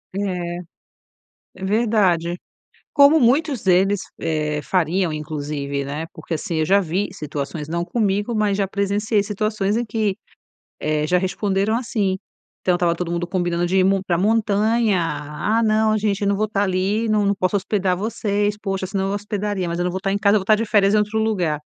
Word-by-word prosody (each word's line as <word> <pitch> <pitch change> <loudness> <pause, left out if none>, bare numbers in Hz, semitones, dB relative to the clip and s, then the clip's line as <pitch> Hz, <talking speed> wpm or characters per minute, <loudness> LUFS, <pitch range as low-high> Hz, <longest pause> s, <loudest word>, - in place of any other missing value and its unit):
É. 180 -3 -2 1.0
É 190 - -11
verdade, 190 -6 +2 0.6
como 285 +3 +6
muitos 270 +1 +2
deles, 190 +1 +3 0.2
eh, 150 -2 -1
fariam, 180 -1 0
inclusive, 145 -2 -4
né, 150 +4 -4
porque - - -8
assim 160 +2 -3
eu - - +2
já 195 +5 +4
vi 185 +3 -1
situações 150 -2 -5
não 170 +1 -1
comigo, 205 +1 0
mas 210 -2 +1
já 200 -1 +1
presenciei 200 +2 0
situações 210 0 -1
em 240 - 0
que, 215 -3 -1 0.6
eh, 150 0 0
já 180 +3 +3
responderam 195 +3 0
assim. 210 -6 -1 0.4
Então 180 - +2
estava 170 -1 +1
todo 175 -1 -3
mundo 175 0 -2
combinando 175 -2 0
de 180 +2 0
ir - - +5
m 195 0 +3
pra 175 -3 +1
montanha. 215 0 +2
"Ah, 165 +8 -1
não, 215 0 +3
gente, 205 -1 -1
eu 200 - +2
não 200 - +2
vou 215 +1 +1
estar 205 -1 0
ali, 195 +4 0
não 210 -1 +2
não 200 0 +2
posso 190 0 0
hospedar 190 -2 0
vocês. 205 0 -1
Poxa, 195 -2 -2
senão 195 0 -2
eu 195 - -1
hospedaria, 205 -2 -2
mas 170 0 -3
eu 175 - 0
não 180 - 0
vou 190 - -2
estar 195 +1 -2
em 200 - 0
casa. 200 +1 +3
Eu - - +2
vou - - -6
estar 215 +2 +4
de 225 - -1
férias 205 -1 +3
em 215 - +5
outro 210 +1 0
lugar". 180 -9 0
195 Hz, 195 wpm, -21 LUFS, 175-210 Hz, 1.0 s, como